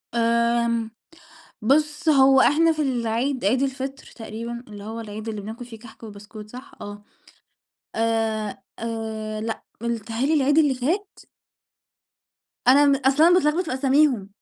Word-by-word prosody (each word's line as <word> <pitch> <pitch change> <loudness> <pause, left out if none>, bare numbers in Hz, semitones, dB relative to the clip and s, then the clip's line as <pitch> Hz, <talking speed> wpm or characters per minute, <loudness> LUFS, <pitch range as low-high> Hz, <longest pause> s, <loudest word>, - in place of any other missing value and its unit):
آمم 235 0 +1 0.7
بُص 300 +6 +1
هو 270 -2 +6
إحنا 325 +4 +4
في 310 -1 -2
العيد 245 0 -1
عيد 250 +7 +2
الفطر 270 0 -4
تقريبًا 235 +2 -7
اللي 205 -1 -10
هو 225 +2 -6
العيد 215 0 -7
اللي 215 -2 -4
بناكل 220 +4 -8
فيه 235 -2 -11
كحك 225 0 -15
وبسكوت 210 0 -11
صح؟ 255 +4 -11
آه 205 0 -9 0.9
آآ 225 -2 -1 0.2
آآ 220 -1 -4
لأ، 225 +1 -4 0.2
مل 235 0 -1
بيتهيأ 230 +3 -3
لي 315 - +2
العيد 290 0 +3
اللي 295 -4 +4
فات؟ 345 +11 -2 1.5
أنا 280 +3 +7
م 280 -1 +4
أصل 275 +3 +2
أنا 345 +2 +6
باتلخبط 340 0 +2
في 315 - -3
أساميهم 265 -5 +2
235 Hz, 145 wpm, -23 LUFS, 220-275 Hz, 1.5 s, أنا